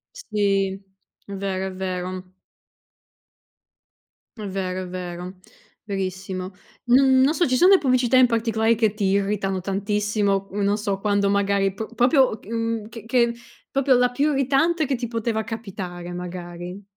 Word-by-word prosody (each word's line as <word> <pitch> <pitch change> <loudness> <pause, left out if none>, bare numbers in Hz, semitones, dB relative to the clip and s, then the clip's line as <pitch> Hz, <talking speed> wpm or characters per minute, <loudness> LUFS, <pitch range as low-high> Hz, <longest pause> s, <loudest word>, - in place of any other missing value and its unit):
Sì. 195 - 0 0.4
È 200 - -8
vero, 190 -1 -2
è 190 - -6
vero. 185 0 -5 2.1
È - - -5
vero, 185 -1 -3
è - - -7
vero. 180 0 -6 0.5
Verissimo. 190 -2 -4 0.4
N 260 +1 +5
non 285 +4 +4
so, 345 +1 +2
ci 255 - +1
son 360 +8 +6
le 390 - +8
pubblicità 255 -3 +2
in 255 -1 +7
particolare 225 -1 +1
che 220 -2 +1
ti 210 -2 -2
irritano 195 -1 0
tantissimo, 200 0 0
uhm, 205 - -4
non 200 +1 +2
so, 200 -2 -2
quando 200 -1 +1
magari 200 -1 +1
p 220 +3 -7
proprio 250 -2 +4
ch - - -19
uhm, 230 -1 -2
ch 230 -1 -10
che 235 0 +2 0.4
proprio 275 -1 +3
la 250 0 +4
più 285 +4 +1
irritante 280 +5 +2
che 270 - 0
ti 240 0 -4
poteva 230 -1 -2
capitare, 190 -6 -6
magari. 180 +1 -7
205 Hz, 150 wpm, -23 LUFS, 190-240 Hz, 2.1 s, le